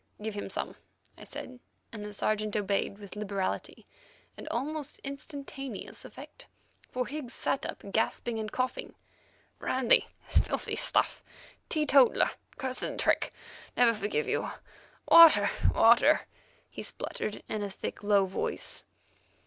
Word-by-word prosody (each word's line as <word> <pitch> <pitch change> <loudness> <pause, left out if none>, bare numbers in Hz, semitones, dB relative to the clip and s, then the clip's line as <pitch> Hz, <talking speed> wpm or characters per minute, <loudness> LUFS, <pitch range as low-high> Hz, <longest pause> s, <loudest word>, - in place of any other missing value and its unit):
"Give 215 0 -4
him 205 - -5
some," - - -3 0.4
I - - -12
said, 255 -1 -7 0.3
and 210 -2 -6
the 210 - -6
Sergeant 215 0 -1
obeyed 200 -1 0
with 205 -1 -10
liberality 200 -2 -3 0.5
and - - -9
almost 295 +4 -3
instantaneous 275 -4 -7
effect, - - -12 0.4
for 250 0 -2
Higgs 275 -3 -6
sat 270 - -1
up - - -7
gasping 225 +1 0
and 215 -1 -4
coughing. 255 0 -2 0.6
"Brandy; 255 -2 +3 0.2
filthy - - 0
stuff; - - +2 0.5
teetotaller! 285 -4 +4 0.3
Cursed 260 -1 -3
trick! - - +2 0.5
Never 240 -1 +6
forgive 205 -8 -1
you. - - 0 0.6
Water, 305 -12 +9 0.2
water," 240 +6 +6 0.5
he - - -8
spluttered 210 - -5
in 215 - -3
a 205 - -2
thick, 195 - -6
low 205 -1 +4
voice. 190 - -3
230 Hz, 125 wpm, -30 LUFS, 205-270 Hz, 0.6 s, Water